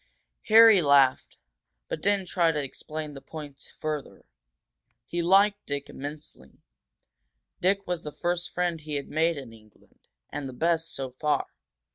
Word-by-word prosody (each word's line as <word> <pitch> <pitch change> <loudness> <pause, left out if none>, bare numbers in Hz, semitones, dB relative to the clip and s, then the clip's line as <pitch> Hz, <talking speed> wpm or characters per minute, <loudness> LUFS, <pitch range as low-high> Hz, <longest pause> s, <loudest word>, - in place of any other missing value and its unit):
Harry 225 -3 +8
laughed, 140 -3 +3 0.5
but 155 - -5
didn't 200 -1 +1
try 170 -2 +2
to 150 - -2
explain 150 +2 -6
the 135 - -10
point 145 -3 -10
further. 150 -3 -5 0.8
He 170 +6 -2
liked 200 +4 +4
Dick 140 0 -4
immensely; 145 - -9 1.0
Dick 195 +2 +1
was 175 -2 -3
the 150 - -6
first 175 +3 -2
friend 175 -2 -1
he 150 0 -5
had 140 - -4
made 160 +1 +1
in 130 -5 -9
England, 110 -1 -22 0.2
and 145 -2 -5
the - - -9
best, 165 +3 0
so 135 -1 -4
far. 145 +2 0
155 Hz, 145 wpm, -27 LUFS, 140-175 Hz, 1.0 s, Harry